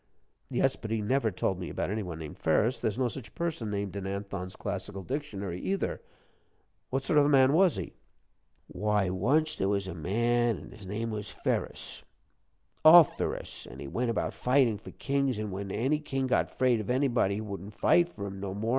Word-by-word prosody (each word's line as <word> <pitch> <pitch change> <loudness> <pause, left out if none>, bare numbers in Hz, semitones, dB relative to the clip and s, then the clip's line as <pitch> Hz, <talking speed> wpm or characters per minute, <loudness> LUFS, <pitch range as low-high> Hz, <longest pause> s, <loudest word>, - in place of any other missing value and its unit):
"Yes, - - +2
but 110 - -7
he 110 0 0
never 115 +3 +1
told 95 -1 -1
me 90 - -5
about - - -2
any 110 +1 -1
one 90 -5 -5
named 80 -2 -8
Ferus; 105 +10 +2
there's 110 0 -1
no 130 -1 +2
such 120 0 -7
person 160 -10 -2
named 100 -2 -3
in 100 -1 -4
Anthon's 100 -1 -5
Classical 95 0 -5
Dictionary, 100 - -4
either. 195 0 -2 0.9
What 135 +1 -1
sort 150 +2 +4
of 145 - +5
a - - +2
man 135 -1 +5
was 180 0 +5
he?" - - -5 0.7
"Why, 100 0 0
once 150 - +2
there 95 - 0
was 100 -1 0
a 95 - -4
man, 115 +7 +1
an' - - -11
his 100 -3 -12
name 110 +4 -3
was 105 -2 -4
Ferus - - -3 0.8
_Of_ferus, 160 - +5
an' 65 - -10
he 70 +1 -7
went 120 - -1
about 115 - -1
fightin' 125 -5 +2
for - - -11
kings, 140 -3 -1
but 105 0 -3
when 100 +1 -5
any 135 +9 +1
king 135 -3 -2
got 130 - +2
afraid 125 -3 +2
of 105 - -5
anybody, 125 -6 +2
he 105 - -3
wouldn't 100 -1 -7
fight 175 0 +4
for 100 -10 -7
him 100 -1 -6
no 95 -1 -4
more. 110 +3 -2
110 Hz, 200 wpm, -29 LUFS, 100-130 Hz, 0.9 s, of